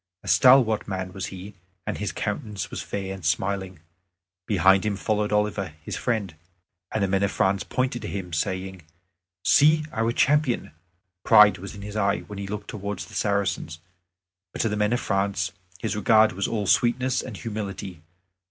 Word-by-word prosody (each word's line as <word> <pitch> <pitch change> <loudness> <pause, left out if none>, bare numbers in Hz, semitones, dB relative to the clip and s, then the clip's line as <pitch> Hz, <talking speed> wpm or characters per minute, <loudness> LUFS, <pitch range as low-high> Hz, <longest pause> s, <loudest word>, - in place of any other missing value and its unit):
A - - -12
stalwart 125 -4 +5
man 95 -2 -4
was 95 0 -4
he, 95 +2 -9 0.3
and - - -3
his - - -2
countenance 105 -3 -4
was - - -4
fair 95 -1 -4
and 95 -2 -10
smiling. 95 +1 -1 0.7
Behind 95 -1 +4
him 105 -2 -1
followed 105 0 -1
Oliver, 105 -5 0
his - - -5
friend; 110 -8 -2 0.6
and 110 - 0
the - - +2
men 95 0 +1
of 100 - +2
France 95 -1 +1
pointed 125 -1 -2
to - - -5
him, 90 -4 -5
saying, 95 +2 -2 0.6
"See 155 +1 +5
our 115 +1 0
champion!" 145 0 +1 0.5
Pride 105 -2 +7
was 100 +3 -8
in 100 - -9
his 105 0 -7
eye 100 -1 +1
when 105 -1 -9
he 100 - -5
looked 105 0 -6
towards 100 -2 -5
the - - -16
Saracens; 100 -5 -1 0.8
but - - -2
to 115 - +1
the 105 - -1
men 105 0 +1
of 120 - +1
France 95 -3 -1 0.3
his 110 - -2
regard 110 +1 +4
was 95 +2 -2
all 105 -3 -2
sweetness 125 +6 +2
and 110 -6 -8
humility. 100 -5 -6
100 Hz, 175 wpm, -25 LUFS, 95-110 Hz, 0.8 s, Pride